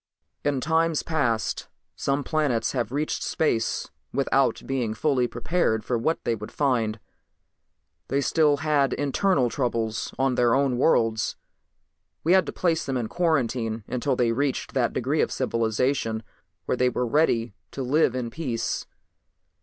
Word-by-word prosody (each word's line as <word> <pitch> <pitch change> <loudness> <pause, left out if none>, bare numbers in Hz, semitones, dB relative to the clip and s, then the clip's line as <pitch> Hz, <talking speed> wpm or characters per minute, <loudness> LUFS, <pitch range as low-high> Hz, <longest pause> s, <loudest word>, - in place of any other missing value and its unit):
"In 140 -3 0
times 160 +1 +1
past 130 -9 -1 0.3
some 140 +1 -1
planets 140 -8 0
have 120 -4 -2
reached 150 +3 -1
space 115 -8 0 0.2
without 135 0 +1
being 125 -5 -1
fully 130 -1 +1
prepared 120 -2 0
for 125 - 0
what 155 +8 0
they 120 - +1
would 105 -1 -6
find. 115 -6 0 1.1
They 135 - +1
still 150 0 +3
had 145 -4 +3
internal 145 0 +1
troubles 115 -4 -1
on 135 0 +2
their 120 -1 +3
own 135 -3 +1
worlds. 115 -6 +2 0.9
We 165 - +2
had 190 -1 +4
to - - -2
place 170 -2 0
them 135 -1 -2
in 115 -3 -3
quarantine 125 -10 0
until 130 +2 0
they 120 -2 +2
reached 135 +2 -1
that 125 -3 +1
degree 135 +5 0
of - - 0
civilization 115 -1 0 0.4
where - - 0
they 125 0 +3
were 125 0 -1
ready 120 -4 +2 0.2
to 135 - -5
live 130 0 +2
in 120 -2 -3
peace. 120 -8 -3
130 Hz, 145 wpm, -25 LUFS, 115-145 Hz, 1.1 s, had